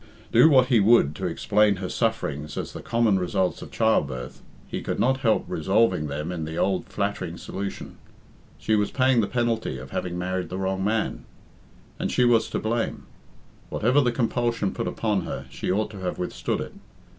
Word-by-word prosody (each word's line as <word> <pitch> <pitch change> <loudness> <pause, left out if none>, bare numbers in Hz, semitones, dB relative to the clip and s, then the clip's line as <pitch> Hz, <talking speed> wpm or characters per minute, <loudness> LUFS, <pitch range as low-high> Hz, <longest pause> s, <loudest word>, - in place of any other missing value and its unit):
Do 160 - +7
what 130 -3 +5
he 120 -4 +5
would 100 -9 +4
to 95 - -2
explain 105 +4 +2
her 95 0 -4
sufferings 75 - -2
as - - -4
the - - -7
common 115 -4 +2
results 90 0 -1
of - - -8
childbirth, 70 - 0 0.3
he - - -4
could - - -3
not 130 +1 +2
help 115 -4 +2
resolving 95 -1 +1
them 75 +4 -4
in 85 -3 -4
the 80 +1 -5
old 95 -1 0
flattering 100 -4 -3
solution. 100 +1 -6 0.6
She 110 - -1
was 105 -1 +1
paying 130 -2 +3
the 100 - 0
penalty 115 - -1
of 65 +1 -10
having 90 -1 -3
married 90 -1 -2
the 90 - -4
wrong 95 0 -1
man. 110 +2 -1 0.7
And - - -1
she 125 - +3
was 115 -2 +3
to - - -2
blame. 115 +1 -2 0.7
Whatever 125 +6 +3
the 125 -3 +2
compulsion 120 -3 0
put 115 - -3
upon 105 -4 0
her, - - -5
she - - -3
ought 105 +3 0
to 100 - -9
have 90 -1 -3
withstood 90 - -2
it. - - -7
100 Hz, 185 wpm, -25 LUFS, 90-115 Hz, 0.7 s, Do